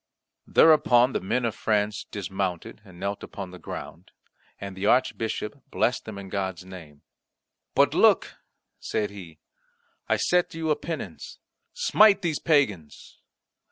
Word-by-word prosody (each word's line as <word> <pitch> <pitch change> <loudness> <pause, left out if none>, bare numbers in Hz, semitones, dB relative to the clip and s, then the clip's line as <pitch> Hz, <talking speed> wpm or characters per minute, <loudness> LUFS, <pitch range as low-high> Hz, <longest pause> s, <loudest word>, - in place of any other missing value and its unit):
Thereupon 130 -6 +5
the - - 0
men 120 +6 -1
of 115 - -1
France 105 -1 -1
dismounted, 95 -1 -4
and 90 -4 -15
knelt 100 0 -3
upon 95 -2 -8
the 90 - -11
ground, - - -8 0.5
and 100 -1 -7
the 95 +2 -2
Archbishop 120 +1 0
blessed 120 - 0
them 110 -2 -8
in 100 -1 -8
God's 95 -2 -3
name. 80 -6 -12 0.7
"But - - +4
look," - - +3 0.4
said 105 -1 -2
he, 90 -6 -11 0.7
"I - - +3
set 180 -1 +1
you 160 -1 -1
a - - +3
penance 165 +1 -7 0.4
smite 215 - +4
these 160 -4 -1
pagans." 110 - -1
105 Hz, 135 wpm, -26 LUFS, 95-140 Hz, 0.7 s, Thereupon